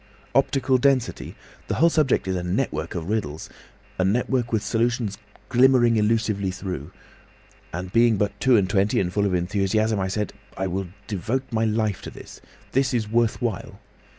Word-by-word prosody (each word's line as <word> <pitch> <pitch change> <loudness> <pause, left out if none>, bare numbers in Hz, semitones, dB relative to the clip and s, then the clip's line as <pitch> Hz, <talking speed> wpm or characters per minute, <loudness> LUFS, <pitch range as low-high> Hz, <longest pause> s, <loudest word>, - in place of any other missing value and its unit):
"Optical 130 -1 +2
density! 130 -2 0 0.3
The - - -1
whole 170 +1 +4
subject 150 -10 +2
is 95 - 0
a 90 - -1
network 90 +1 -2
of 85 -1 -4
riddles—a 95 -2 -5
network 120 +4 0
with 110 -3 0
solutions 115 -3 -1 0.3
glimmering 125 -2 +5
elusively 105 -2 +1
through. 90 -5 -5 0.8
And 90 +2 -6
being 115 -2 +4
but 105 0 -1
two 130 -3 +4
and 100 -3 +2
twenty 100 +2 +2
and 90 -2 -1
full 100 -1 +2
of 95 - 0
enthusiasm, 105 +4 +1
I 95 - 0
said, 105 0 -2 0.2
'I 95 - -1
will 95 +1 -2 0.2
devote 110 +6 -2
my 115 0 +1
life 110 -3 0
to - - -7
this. - - -12 0.3
This 130 -1 +1
is 110 -3 0
worth 115 0 +1
while. 115 -6 -3
110 Hz, 165 wpm, -24 LUFS, 95-120 Hz, 0.8 s, glimmering